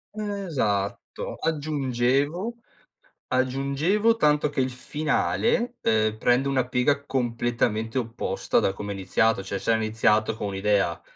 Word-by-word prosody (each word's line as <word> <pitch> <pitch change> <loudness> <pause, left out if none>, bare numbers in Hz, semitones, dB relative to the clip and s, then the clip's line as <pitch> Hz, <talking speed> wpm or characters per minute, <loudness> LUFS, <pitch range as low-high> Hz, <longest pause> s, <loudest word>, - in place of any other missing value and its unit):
Esatto. 165 - -2
Aggiungevo 145 - 0 0.7
aggiungevo 140 - +1
tanto 150 -4 +3
che 145 -2 -1
il 130 - 0
finale, 155 - 0
ehm, 110 -1 +1
prende 125 +4 +2
una 130 -2 +1
piega 130 +3 +1
completamente 120 -3 -1
opposta 115 -2 -1
da - - +1
come 100 +1 -6
è - - -4
iniziato, 100 +2 +1
cioè, 100 - -3
se 115 - 0
era 110 0 +2
iniziato 110 0 +2
con 105 - -3
un'idea, 100 -3 0
130 Hz, 125 wpm, -25 LUFS, 110-150 Hz, 0.7 s, tanto